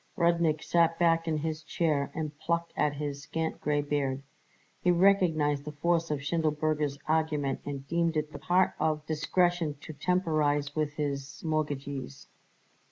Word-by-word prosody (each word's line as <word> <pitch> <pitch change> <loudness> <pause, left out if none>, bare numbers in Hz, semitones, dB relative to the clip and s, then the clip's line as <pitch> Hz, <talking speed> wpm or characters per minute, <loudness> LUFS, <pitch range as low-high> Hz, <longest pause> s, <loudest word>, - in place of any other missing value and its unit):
Rudnik 170 -3 +2
sat 165 -1 +3
back 165 -1 +3
in 160 -1 +1
his 155 0 -3
chair 155 -3 0
and 155 -2 -3
plucked 170 0 -1
at 150 -1 +1
his 145 -1 -4
scant 160 +3 -3
gray 145 -1 +1
beard. 140 -2 -1 0.6
He 180 - +2
recognized 170 -6 +3
the 150 0 -7
force 165 +2 +1
of 145 -2 -2
Schindelberger's 150 -2 0
argument 155 -3 +1
and 140 -1 -5
deemed 170 +1 +1
it 150 0 -1
the 145 - -8
part 180 +5 +3
of 155 -1 0
discretion 165 0 +1
to 155 - -8
temporize 150 -4 +1
with 155 -1 0
his 140 -2 -4
mortgagees. 145 -3 -3
155 Hz, 150 wpm, -29 LUFS, 145-165 Hz, 0.6 s, sat